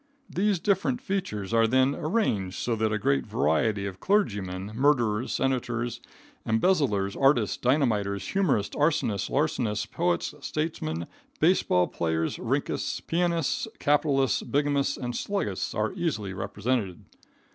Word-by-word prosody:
These 200 +1 +1
different 200 +7 +1
features 190 - -3
are 115 0 +4
then 130 +3 +3
arranged 145 - -1
so 120 - -1
that 110 0 0
a 110 - +1
great 70 -10 +1
variety 100 +8 +1
of 95 -1 -6
clergymen, 100 - 0
murderers, 120 -3 +2
senators, 120 -2 -1 0.4
embezzlers, 110 - +1
artists, 135 -6 +3
dynamiters, 110 -7 0
humorists, 160 - +1
arsonists, 145 - +1
larcenists, 125 -7 0
poets, 175 +1 -1
statesmen, 140 - -3 0.3
base - - +4
ball 90 0 +2
players, 80 -2 -1
rinkists, - - -1
pianists, 170 - 0
capitalists, 145 -2 +2
bigamists 140 -1 0
and 120 -2 -4
sluggists 200 +9 -2
are - - 0
easily 145 - -2
represented. 100 0 -2
120 Hz, 120 wpm, -27 LUFS, 100-155 Hz, 0.4 s, are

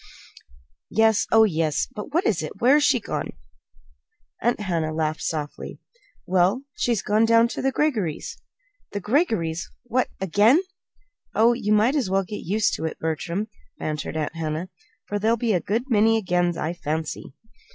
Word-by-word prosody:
"Yes; 220 -1 +3
oh, 225 0 +7
yes! 160 -7 +1
But 210 +5 -7
what 340 +5 +1
is 175 -6 +1
it? 155 - -5
Where's 280 +5 +5
she 280 -4 +4
gone?" - - -4 1.1
Aunt 240 +1 +1
Hannah 165 -5 -1
laughed 155 0 -2
softly. 150 -2 -4 0.5
"Well, 185 +8 +2
she's 235 -5 0
gone 215 +2 +2
down 230 +1 +5
to - - -4
the 270 - +1
Greggorys'." 215 - -1 0.6
"The 205 - -2
Greggorys'! 200 - 0 0.2
What 245 +1 0
again?" 205 - +4 0.8
"Oh, 230 +2 +5
you 225 -3 -2
might 215 +6 +4
as 265 -10 0
well 195 +1 +2
get 205 +3 -7
used 205 +5 +1
to 160 - -4
it, 160 - -4
Bertram," 170 +6 -2 0.3
bantered 155 +1 -4
Aunt 155 0 -2
Hannah, 160 +2 -3 0.4
"for 205 - -3
there'll 225 +3 +2
be 230 -1 0
a 180 - +2
good 225 +4 -1
many 225 -2 +4
'agains,' 175 -4 0
I 160 - -2
fancy." 155 -4 -4
205 Hz, 160 wpm, -24 LUFS, 165-230 Hz, 1.1 s, oh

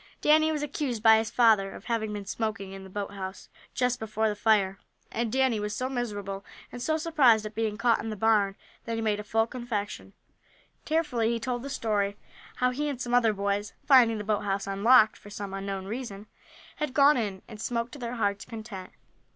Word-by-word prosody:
Danny 310 +1 +4
was 300 -1 -2
accused 270 -6 -3
by 220 -1 +7
his 220 -1 -2
father 220 -5 +4
of - - -11
having 225 -3 -1
been 205 -1 -5
smoking 200 -2 -3
in 195 0 -8
the 190 - -11
boathouse 195 -1 -6 0.3
just 250 -1 +1
before 220 0 -1
the 210 - -2
fire, 205 -3 +2 0.3
and 230 -1 -2
Danny 260 -3 +2
was 210 0 -3
so 255 - -2
miserable, 205 -6 -4 0.3
and 245 - -7
so 315 +4 +1
surprised 275 -10 +4
at 215 - -6
being 220 -1 -1
caught 235 +2 +3
in 225 - -4
the 215 - -4
barn, 210 -2 +2 0.3
that 230 - -2
he 225 - -2
made 210 -2 0
a - - -5
full 225 +2 +1
confession. 230 -4 -5 0.7
Tearfully 295 -8 +1
he 235 - -1
told 245 0 -2
the 275 - -6
story, 205 -5 -1 0.4
how 250 0 +2
he 295 +4 -2
and 275 -4 -4
some 245 -1 -3
other 240 -3 +5
boys, 200 0 -2
finding 245 -5 +6
the 210 - -4
boat 210 0 0
house 195 -1 -1
unlocked, 215 +3 +5
for 205 - -14
some 200 -1 -6
unknown 195 -1 -4
reason, 210 -2 -6 0.5
had 300 -4 -3
gone 285 +1 +6
in, 205 -5 -3
and 215 -2 -10
smoked 235 0 -2
to 285 - -10
their 240 0 -4
heart's 205 -3 0
content. 215 -5 -8
220 Hz, 205 wpm, -28 LUFS, 205-245 Hz, 0.7 s, by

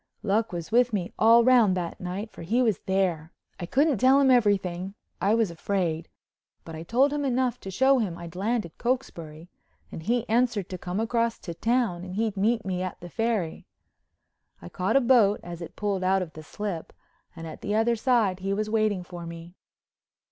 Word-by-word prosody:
Luck 220 +2 +1
was 170 +1 -6
with 240 0 +3
me 185 -4 -2
all 230 +1 +6
round 230 -7 +5
that 175 -2 -4
night, 190 +4 -5
for - - -12
he 230 +10 +1
was 220 -5 +1
there. 180 -4 0 0.3
I 175 - -5
couldn't 280 - +2
tell 265 +4 +5
him 270 -2 +4
everything—I 195 -2 0
was 225 -6 +1
afraid—but 170 -2 -5
I 160 - -7
told 255 - +2
him 295 -1 -1
enough 255 -2 0
to 195 - -8
show 265 +7 +3
him 185 -7 -2
I'd 170 0 -9
landed 210 -2 -2
Cokesbury 170 -11 -3 0.4
and - - -7
he 235 +7 -1
answered 225 -4 +1
to 185 - -6
come 180 +3 -4
across 230 0 0
to 170 - -6
town 220 -2 0
and 185 0 -7
he'd 220 -1 -1
meet 220 +3 +1
me 185 -1 -2
at 185 -1 -5
the 175 - -9
Ferry. 220 -6 -2 0.9
I 85 - -10
caught 185 +6 -1
a - - +4
boat 235 -5 +4
as 175 0 -8
it 170 - -8
pulled 200 -3 -2
out 190 0 +2
of 160 - -10
the 155 - -9
slip 175 +2 -6 0.4
and 165 -1 -8
at 160 - -9
the 205 - -2
other 230 +2 +2
side 220 -6 +1
he 195 +1 -2
was 215 +1 -2
waiting 215 -4 +1
for 175 -1 -9
me. 170 +1 -9
200 Hz, 190 wpm, -26 LUFS, 175-235 Hz, 0.9 s, all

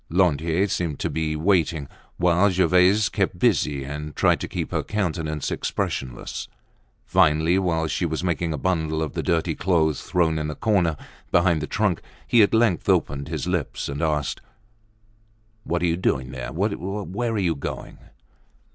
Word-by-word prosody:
Lantier 85 +1 +2
seemed 85 -6 -2
to - - -2
be 80 -1 -1
waiting, 80 -3 +1 0.3
while 90 +3 +4
Gervaise 95 +3 +4
kept 100 -3 -1
busy 85 - +1
and 75 +2 -6
tried - - +3
to - - -4
keep - - -4
her - - 0
countenance 80 -7 -2
expressionless. 65 -2 -3 0.6
Finally, 80 +4 +3
while 80 -4 0
she 85 +2 -1
was 80 +2 -3
making 85 -2 -1
a 75 - -2
bundle 80 -1 0
of 75 - -4
the - - -2
dirty 80 0 0
clothes 80 -4 +1
thrown 80 -3 +1
in 75 0 -2
a 75 - -5
corner, 95 -8 +1 0.3
behind 85 -3 +3
the 75 - -3
trunk, 105 -5 0 0.2
he 120 - +5
at 100 - +4
length 110 -7 +2
opened 70 0 +1
his - - -3
lips 90 -5 -2
and 70 +2 -4
asked: 75 -3 -1 1.2
"What 85 +1 -1
are - - +3
you 85 0 +1
doing 65 -8 0
there? - - -6
Where 100 +4 -2
are - - -1
you 90 -5 +1
going?" 70 - -6
85 Hz, 165 wpm, -24 LUFS, 75-95 Hz, 1.2 s, he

